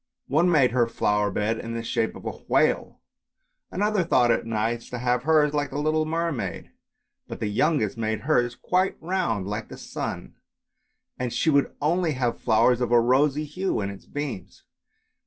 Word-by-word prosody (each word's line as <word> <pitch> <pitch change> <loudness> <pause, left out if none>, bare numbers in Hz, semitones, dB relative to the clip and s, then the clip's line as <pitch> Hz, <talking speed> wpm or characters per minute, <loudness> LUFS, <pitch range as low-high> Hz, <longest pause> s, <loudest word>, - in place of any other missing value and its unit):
One 160 +6 +2
made 145 -7 +4
her 120 -1 +2
flower 105 -2 +1
bed 105 +3 -1
in 115 0 -5
the 115 - -3
shape 115 -1 -1
of - - -11
a - - -2
whale, - - 0 0.7
another 205 0 +1
thought 125 -7 +3
it 115 - 0
nice 115 +1 -2
to 125 - -5
have 125 0 0
hers 150 0 +3
like 145 -1 -1
a - - -4
little 155 +1 +1
mermaid; 160 - -3 0.6
but - - -7
the - - -2
youngest 110 0 0
made 110 -1 -1
hers 120 -4 +1
quite 185 +6 0
round 165 - -1
like 105 +2 -4
the - - -9
sun, - - -6 0.9
and 125 -1 -2
she 160 - +1
would 140 -1 +2
only 165 +2 +1
have 125 -3 -2
flowers 115 +2 +3
of 120 - -1
a 120 - +6
rosy 135 +5 +2
hue 185 +6 -2
like 100 -2 -2
its 100 - -13
beams. 145 - -6
125 Hz, 175 wpm, -25 LUFS, 115-155 Hz, 0.9 s, a